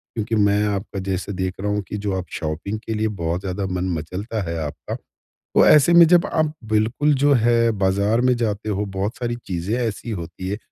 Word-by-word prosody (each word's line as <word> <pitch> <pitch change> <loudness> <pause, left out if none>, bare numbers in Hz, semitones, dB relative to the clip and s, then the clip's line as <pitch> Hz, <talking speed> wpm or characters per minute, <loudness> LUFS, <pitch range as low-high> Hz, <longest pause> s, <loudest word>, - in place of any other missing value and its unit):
क्योंकि 110 0 -1
मैं 105 -1 +3
आपका 100 -1 -3
जैसे 95 +1 -3
देख 95 0 -2
रहा 105 - -1
हूँ 105 0 0
कि 105 - -3
जो 100 -2 -1
आप 95 - -4
शॉपिंग 85 +7 -4
के 110 - -2
लिए 110 0 0
बहुत 85 +2 -1
ज़्यादा 95 +1 -3
मन 90 0 -2
मचलता 95 +8 -4
है 85 - -3
आपका। 75 - -6 0.6
तो - - +6
ऐसे 150 +3 +6
में 170 -1 +8
जब 175 +1 +4
आप 155 -1 +1 0.2
बिल्कुल 115 +8 +2
जो 145 0 +5
है 115 -1 +3
बाज़ार 100 +4 +2
में 125 0 +3
जाते 110 -2 -2
हो 105 0 -1
बहुत 100 +4 -1
सारी 120 -1 -3
चीज़ें 90 +4 -2
ऐसी 115 0 -3
होती 95 -1 -5
हैं, 100 - -2
105 Hz, 205 wpm, -22 LUFS, 95-115 Hz, 0.6 s, में